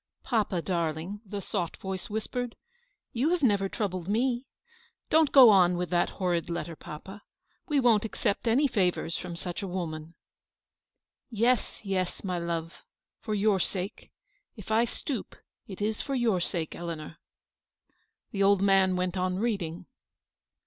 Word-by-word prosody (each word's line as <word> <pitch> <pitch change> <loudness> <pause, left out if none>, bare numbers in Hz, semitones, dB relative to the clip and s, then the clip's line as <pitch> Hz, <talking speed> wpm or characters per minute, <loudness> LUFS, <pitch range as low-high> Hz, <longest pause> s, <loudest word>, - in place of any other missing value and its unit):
" - - -48
Papa, 210 -8 0
darling/' 170 +2 -2
the 200 0 -5
soft 175 -4 -3
voice 190 -1 -5
whispered, 230 +3 -3 0.3
" - - -46
you 255 +6 +1
have 350 -3 +1
never 200 -5 +3
troubled 185 -5 -3
me. 240 +4 0 0.6
Don't 315 -2 +5
go 255 -5 +10
on 180 -3 +5
with 180 0 -3
that 175 0 +2
horrid 175 -3 0
letter, 170 -1 -3
papa. 190 +8 -9 0.5
We 295 -3 +2
won't 230 -5 +4
accept 220 0 -1
any 265 +6 +4
favours 180 -7 0
from 175 -1 -6
such 175 +1 -5
a 195 - -3
woman." 165 -3 -5 0.6
" - - -62
Yes, 235 0 +1
yes, 190 -3 -2
my 180 -3 -1
love, 170 -1 -4 0.4
for 215 - -3
your 205 -1 +3
sake; 185 +2 -3 0.5
if 210 -2 -9
I 225 +2 +4
stoop, 245 0 -5 0.3
it 200 0 -5
is 215 0 -1
for 275 - -3
your 230 -7 +2
sake, 170 -2 -2
Eleanor." 165 -2 -6 1.1
The 200 - -2
old 200 0 +4
man 195 -1 +4
went 180 +1 -1
on 185 0 0
reading. 190 -6 -2
195 Hz, 155 wpm, -29 LUFS, 175-225 Hz, 1.1 s, go